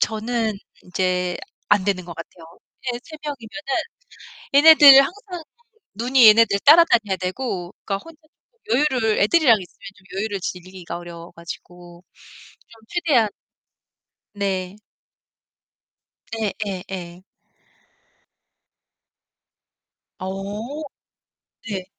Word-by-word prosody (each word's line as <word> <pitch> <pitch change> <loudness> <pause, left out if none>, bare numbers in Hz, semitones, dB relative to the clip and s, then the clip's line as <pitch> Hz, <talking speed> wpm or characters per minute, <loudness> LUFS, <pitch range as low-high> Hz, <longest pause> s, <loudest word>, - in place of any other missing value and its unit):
저는 225 0 -1 0.3
인제 180 -1 -1 0.3
안 205 -2 +4
되는 190 -3 -1
것 170 -1 -9
같아요. 165 0 -11 0.5
애 - - -5
3 315 - -11
명이면은 290 - -5 0.8
얘네들 280 -3 +9
항상 360 +3 -6 0.5
눈이 245 +1 +5
얘네들 215 -2 +5
따라다녀야 235 - +5
되고 185 -1 -4
그러니까 195 - -1
혼자 330 -1 -15
쪼끔 460 +9 -36 0.4
여유를 220 -1 +1
애들이랑 235 +1 +4
있으면 180 - -13
좀 195 0 -9
여유를 205 -2 -3
즐기기가 180 -1 -7
어려워 170 -1 -10
가지고 175 +1 -11 0.7
좀 225 -1 -19
최대한 295 -11 +2 1.1
네. 195 -2 -3 1.6
예 220 -3 -2
예 185 -2 -5
예. 175 -1 -8 3.0
어. 205 +9 -6 0.9
네. 190 -3 -4
205 Hz, 205 characters per minute, -21 LUFS, 185-260 Hz, 3.0 s, 얘네들